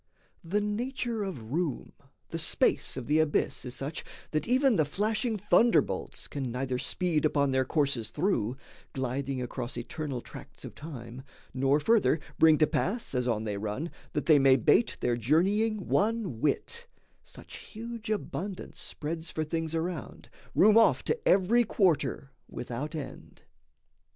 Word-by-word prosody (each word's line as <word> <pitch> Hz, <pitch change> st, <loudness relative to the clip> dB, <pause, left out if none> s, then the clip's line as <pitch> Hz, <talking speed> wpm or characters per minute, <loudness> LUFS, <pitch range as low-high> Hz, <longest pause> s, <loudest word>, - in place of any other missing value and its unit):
The 195 Hz, +5 st, 0 dB
nature 230 Hz, +2 st, -2 dB
of 130 Hz, -, -5 dB
room, 160 Hz, -4 st, -2 dB, 0.4 s
the 165 Hz, -, -4 dB
space 160 Hz, -, +1 dB
of 130 Hz, -, -4 dB
the 150 Hz, +4 st, +2 dB
abyss 155 Hz, -3 st, +1 dB
Is 125 Hz, -, -6 dB
such 140 Hz, +4 st, -4 dB, 0.3 s
that 155 Hz, +6 st, -1 dB
even 260 Hz, 0 st, +4 dB
the 155 Hz, -, +4 dB
flashing 215 Hz, -, -1 dB
thunderbolts 225 Hz, +4 st, +2 dB
Can 135 Hz, -4 st, -4 dB
neither 125 Hz, 0 st, -2 dB
speed 170 Hz, -1 st, 0 dB
upon 140 Hz, -2 st, +2 dB
their 130 Hz, 0 st, +2 dB
courses 140 Hz, -6 st, 0 dB
through, 130 Hz, -, 0 dB, 0.4 s
Gliding 130 Hz, 0 st, -2 dB
across 125 Hz, 0 st, -5 dB
eternal 135 Hz, +2 st, -4 dB
tracts -, -, -11 dB
of -, -, -8 dB
time, 125 Hz, -5 st, -8 dB, 0.3 s
Nor, 135 Hz, +3 st, +2 dB
further, 205 Hz, -2 st, +3 dB, 0.2 s
bring 160 Hz, -1 st, +7 dB
to 155 Hz, -, +5 dB
pass, 205 Hz, -, -2 dB
as 125 Hz, -1 st, 0 dB
on 110 Hz, -3 st, 0 dB
they 105 Hz, -2 st, -3 dB
run, 110 Hz, +11 st, -3 dB, 0.2 s
That 150 Hz, -, -1 dB
they 155 Hz, -3 st, +6 dB
may 135 Hz, -1 st, +6 dB
bate 155 Hz, -, +3 dB
their 120 Hz, -1 st, +1 dB
journeying 195 Hz, -, +2 dB
one 210 Hz, -, 0 dB
whit: 470 Hz, -, -1 dB, 0.4 s
Such -, -, -11 dB
huge 230 Hz, 0 st, -8 dB
abundance 200 Hz, -2 st, -4 dB
spreads 160 Hz, +2 st, -4 dB
for 155 Hz, -, -2 dB
things 160 Hz, +1 st, -2 dB
around 165 Hz, -3 st, -4 dB, 0.2 s
Room 215 Hz, +3 st, +7 dB
off 225 Hz, -, +4 dB
to 455 Hz, -1 st, -2 dB
every 205 Hz, +6 st, +4 dB
quarter, 180 Hz, -9 st, +1 dB, 0.2 s
without 130 Hz, +7 st, -5 dB
end. 150 Hz, -3 st, -8 dB
155 Hz, 150 wpm, -29 LUFS, 130-205 Hz, 0.4 s, bring